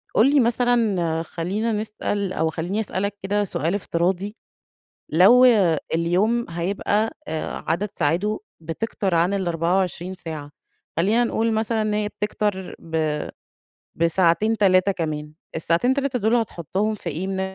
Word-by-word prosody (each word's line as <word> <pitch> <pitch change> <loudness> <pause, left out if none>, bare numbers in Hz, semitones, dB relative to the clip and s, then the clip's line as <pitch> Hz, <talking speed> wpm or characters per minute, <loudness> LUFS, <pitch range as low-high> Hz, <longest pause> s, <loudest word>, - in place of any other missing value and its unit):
قل 275 - +5
لي 290 - +5
مثلًا، 225 -9 +2
خلينا 195 +8 -2
نسأل 210 -2 -2
أو 160 - +1
خليني 170 +6 -3
أسألك 200 -1 -2
كده 205 +1 +1
سؤال 175 -2 -1
افتراضي، 190 +2 -1 0.7
لو 195 +11 +6 0.5
اليوم 190 +9 +1
هيبقى، 200 +5 0 0.2
آآ، 160 0 -4
عدد 170 +6 0
ساعاته 175 +8 0 0.2
بتكتَر 185 +3 -2
عن 170 +4 +2
ال24 180 0 0
ساعة، 155 -5 -7 0.5
خلينا 210 +9 +3
نقول 225 -1 0
مثلًا 220 0 0
إن 215 -1 0
هي 210 0 0
بتكتَر 210 -3 -3
ب 160 -2 -1 0.8
بساعتين، 170 +6 +2
3 195 -1 +4
كمان، 150 -3 -4 0.2
الساعتين، 170 +11 +2
3 275 -2 -1
دول 220 +1 +2
هتحطهم 210 -1 -1
في 185 -5 -5
إيه 165 +5 -4
من 190 0 -2
190 Hz, 130 wpm, -23 LUFS, 170-215 Hz, 0.8 s, لو